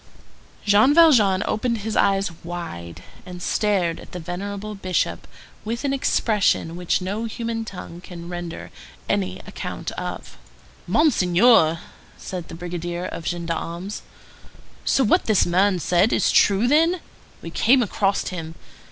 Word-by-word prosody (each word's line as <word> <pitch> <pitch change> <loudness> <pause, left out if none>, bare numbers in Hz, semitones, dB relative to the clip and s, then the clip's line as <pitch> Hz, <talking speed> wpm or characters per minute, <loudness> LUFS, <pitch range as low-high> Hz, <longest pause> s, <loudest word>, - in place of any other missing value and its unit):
Jean 215 +8 +5
Valjean 225 - +5
opened 235 +2 -1
his 215 +1 -4
eyes 195 -1 +2
wide, 165 - -7 0.2
and 180 -1 -9
stared 180 -3 0
at - - -14
the 180 - -5
venerable 200 +5 -5
Bishop 185 -3 -2 0.4
with 230 +4 -4
an 275 - +1
expression 210 -10 +1
which 180 +1 -1
no 205 +5 -3
human 230 0 -3
tongue 180 -4 -9
can 170 -2 -9
render 175 -1 -6 0.4
any 95 -2 -1
account - - -6
of. 60 - -7 0.5
"Monseigneur," 185 - +4 0.4
said 180 -3 -6
the - - -9
brigadier 175 0 -4
of 165 - -6
gendarmes, 170 +2 -4 0.8
"so 270 - +2
what 215 - +3
this 215 -4 +3
man 185 +2 +2
said 180 +5 +2
is - - +2
true, 200 +4 +4
then? 330 +6 +3 0.4
We - - -7
came 255 +1 +4
across 200 -1 0
him. 165 -3 -6
190 Hz, 135 wpm, -23 LUFS, 175-220 Hz, 0.8 s, Jean